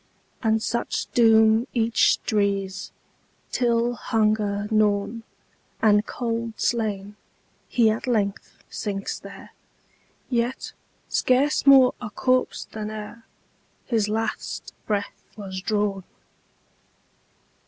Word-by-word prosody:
And 220 -1 +1
such 235 - -2
doom 225 0 +5
each 230 -1 +3
drees, 200 -2 -1 0.6
Till, 240 -1 +1
hunger 215 -3 0
gnawn, 215 +1 +1 0.6
And 210 -1 +3
cold 230 -2 -3
slain, 210 -3 -1 0.5
he 235 -3 +3
at 220 +4 -4
length 205 -5 -1
sinks 195 -1 -4
there, - - -12 0.8
Yet 245 +1 -2 0.3
scarce 275 +3 +1
more 265 -2 +8
a 240 - -5
corpse 255 +4 0
than 215 -1 -6
ereHis 215 0 -6
last 225 +1 -3
breath 205 -2 -2 0.2
was 190 -2 -6
drawn. 205 -1 -1
220 Hz, 90 wpm, -24 LUFS, 205-235 Hz, 0.8 s, more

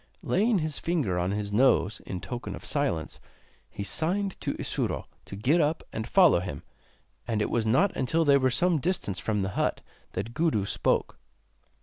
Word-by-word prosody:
Laying 220 +1 +2
his 155 -3 -2
finger 145 - 0
on 90 +1 0
his 100 0 -3
nose, 110 -5 +3
in 90 -1 -4
token 120 -1 -5
of - - -11
silence, 140 - -1 0.5
he 100 - -6
signed 180 - -1
to - - -2
Isuro - - -2 0.2
to - - -8
get 135 - +2
up 155 +2 0
and 110 0 -4
follow 180 - +5
him, 85 -6 -6 0.6
and 110 -2 0
it - - -1
was 115 -2 0
not 175 - +3
until 160 +6 +1
they 140 -1 +6
were 130 -1 +2
some 170 +5 +2
distance 145 - -2
from 105 -2 -1
the 95 - -1
hut 95 - -1 0.3
that 105 +5 -4
Gudu 150 - +1
spoke. - - 0
125 Hz, 180 wpm, -27 LUFS, 100-165 Hz, 0.6 s, they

